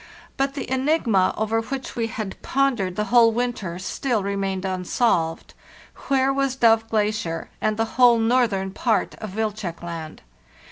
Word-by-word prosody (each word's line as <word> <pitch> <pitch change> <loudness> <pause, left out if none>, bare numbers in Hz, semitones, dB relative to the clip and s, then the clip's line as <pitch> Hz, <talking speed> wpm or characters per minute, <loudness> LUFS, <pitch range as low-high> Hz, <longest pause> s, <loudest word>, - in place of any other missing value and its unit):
But 275 0 -1
the 280 - -4
enig 270 +5 +1
ma 195 -5 +3
over 220 +1 0
which 265 +3 -6
we 230 -2 -1
had 215 -4 -6
pondered 245 -10 0
the 210 - 0
whole 230 -2 +7
winter 225 -7 -2
still 215 +4 -2
remained 195 -1 -2
unsolved. 180 -2 0 0.5
Where 270 0 +2
was 275 -1 0
Dove 225 -3 +3
Glacier 210 -6 -1
and 215 0 0
the 225 - +1 0.2
whole 240 -1 +7
northern 225 -5 +1
part 220 +2 0
of 210 -3 -7
Wilczek 210 -6 -3
Land? 165 -2 -7
220 Hz, 150 wpm, -23 LUFS, 190-245 Hz, 0.5 s, whole